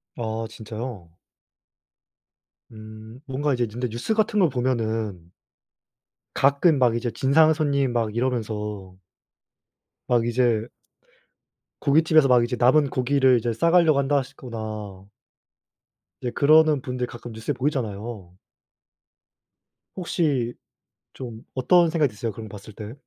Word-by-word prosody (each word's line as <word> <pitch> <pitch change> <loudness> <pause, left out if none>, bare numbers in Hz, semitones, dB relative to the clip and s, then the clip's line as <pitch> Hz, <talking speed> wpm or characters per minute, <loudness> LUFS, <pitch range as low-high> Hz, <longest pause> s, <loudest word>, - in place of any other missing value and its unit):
아 115 -1 -3
진짜요? 110 -5 -8 1.6
음. 110 +2 -12
뭔가 145 0 -1
이제 125 -1 0
근데 120 +4 -4
뉴스 120 - -2
같은 215 -1 +1
걸 175 -5 +4
보면은 110 -8 -2 1.0
가끔 140 +3 +3
막 120 -3 +3
이제 120 0 -2
진상 150 +6 +4
손님 140 -4 0
막 115 -3 -1
이러면서 105 -6 -3 1.1
막 120 -2 +2
이제 120 -2 +1 1.1
고깃집에서 155 0 +4
막 125 -2 +4
이제 125 +1 -2
남은 140 +4 +4
고기를 130 0 +3
이제 115 +1 -2
싸 165 +9 +1
가려고 165 -5 +4
한다 140 +1 +1
하시거나 110 -7 -6 1.2
이제 120 - -3
그러는 155 -1 +4
분들 125 -1 -3
가끔 120 0 -10
뉴스에 110 +6 -3
보이잖아요. 115 -8 -4 1.6
혹시 145 -9 -1 0.6
좀 120 -3 -8
어떤 170 +6 +3
생각이 155 -4 +1
드세요 110 +2 -4
그런 110 +1 -9
거 105 - -9
봤을 105 +1 -13
때? 105 +2 -8
125 Hz, 245 characters per minute, -24 LUFS, 110-140 Hz, 1.6 s, 걸